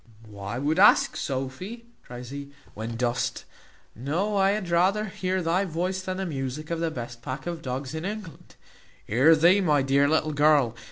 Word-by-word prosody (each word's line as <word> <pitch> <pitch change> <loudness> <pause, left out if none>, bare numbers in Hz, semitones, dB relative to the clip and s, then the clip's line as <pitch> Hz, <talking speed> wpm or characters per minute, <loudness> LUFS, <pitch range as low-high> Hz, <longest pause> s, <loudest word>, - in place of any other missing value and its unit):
"Why 100 +2 -6
wout 150 +6 0
ask, 205 - +6
Sophy?" 140 - -5 0.2
cries 125 0 -9
he, 140 0 -7 0.2
"when 110 +2 -5
dost 120 +1 -2 0.5
know 170 - -1
I 195 -1 +4
had 205 -2 -1
rather 190 +5 +2
hear 185 -2 -2
thy 170 +4 +1
voice 185 +1 -2
than 185 0 -4
the 190 - -2
musick 145 0 -4
of 165 - -1
the 165 0 0
best 120 -5 -7
pack 130 +3 -6
of 170 -2 -4
dogs 130 +1 -4
in 160 0 -4
England. 200 -3 -7 0.5
Hear 135 +9 +5
thee, 175 +6 +5
my 150 -6 +2
dear 140 +1 +3
little 155 0 +1
girl! 145 -5 +3
155 Hz, 175 wpm, -26 LUFS, 130-185 Hz, 0.5 s, ask